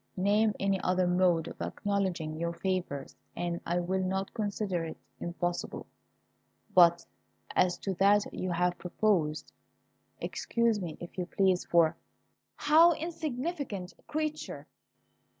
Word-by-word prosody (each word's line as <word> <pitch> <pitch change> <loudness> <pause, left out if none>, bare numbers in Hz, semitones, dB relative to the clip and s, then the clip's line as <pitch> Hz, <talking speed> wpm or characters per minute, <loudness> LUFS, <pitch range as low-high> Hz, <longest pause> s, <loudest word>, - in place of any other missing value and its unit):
Name 205 +3 +3
any 195 -1 +1
other 185 0 +2
mode 175 -2 +3
of - - -9
acknowledging 190 -6 -1
your 170 +1 -2
favours, 175 -7 -3 0.2
and 170 -1 -2
I 175 +1 +1
will 185 +2 0
not 190 +1 -2
consider 205 -5 -2
it 160 - -6 0.2
impossible; 175 0 -3 0.9
but 170 -1 +6 0.5
as 180 -1 +3
to 195 - -3
that 200 +3 +4
you 185 - -3
have 175 +1 0
proposed, 180 -5 0 0.7
excuse 230 -3 0
me 165 -4 -5
if 175 +2 -8
you 180 - -2
please, 190 -2 +2
for 170 -2 +4 0.3
" - - -49
"How! 330 +3 +7
insignificant 300 - -4
creature!" 310 0 -3
185 Hz, 125 wpm, -30 LUFS, 175-205 Hz, 0.9 s, How